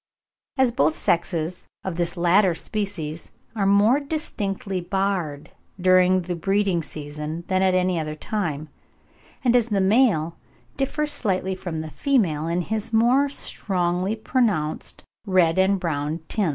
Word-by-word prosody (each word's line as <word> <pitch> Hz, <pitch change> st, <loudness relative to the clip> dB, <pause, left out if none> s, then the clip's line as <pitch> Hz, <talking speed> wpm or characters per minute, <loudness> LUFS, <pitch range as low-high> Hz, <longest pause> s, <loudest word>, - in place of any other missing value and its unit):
As 260 Hz, -2 st, +4 dB
both 155 Hz, -6 st, +2 dB
sexes 170 Hz, +1 st, -1 dB, 0.2 s
of 190 Hz, -3 st, -3 dB
this 170 Hz, +1 st, -2 dB
latter 175 Hz, +1 st, +4 dB
species 170 Hz, -7 st, -4 dB, 0.3 s
are 200 Hz, -3 st, +1 dB
more 205 Hz, +7 st, +5 dB
distinctly 205 Hz, -, -3 dB
barred 180 Hz, -6 st, -2 dB, 0.3 s
during 185 Hz, 0 st, +4 dB
the 175 Hz, 0 st, -3 dB
breeding 195 Hz, 0 st, +1 dB
season 150 Hz, +2 st, -6 dB
than 185 Hz, 0 st, +2 dB
at 190 Hz, -1 st, +3 dB
any 180 Hz, -1 st, +1 dB
other 155 Hz, -1 st, -4 dB
time, 155 Hz, -5 st, -3 dB, 0.7 s
and 245 Hz, -2 st, +3 dB
as 240 Hz, -2 st, +3 dB
the 205 Hz, -2 st, +1 dB
male 190 Hz, -6 st, +2 dB, 0.4 s
differs 295 Hz, +2 st, -1 dB
slightly 190 Hz, -3 st, 0 dB
from 175 Hz, -4 st, -5 dB
the 155 Hz, -1 st, -7 dB
female 175 Hz, -, +1 dB
in 170 Hz, +2 st, 0 dB
his 220 Hz, +3 st, -3 dB
more 245 Hz, +5 st, +4 dB
strongly 185 Hz, -5 st, -1 dB
pronounced 215 Hz, -, -1 dB, 0.2 s
red 185 Hz, -2 st, +3 dB
and 190 Hz, +1 st, +3 dB
brown 155 Hz, -2 st, -2 dB
tints -, -, -6 dB
(10. 200 Hz, -6 st, +2 dB
185 Hz, 140 wpm, -23 LUFS, 165-210 Hz, 0.7 s, more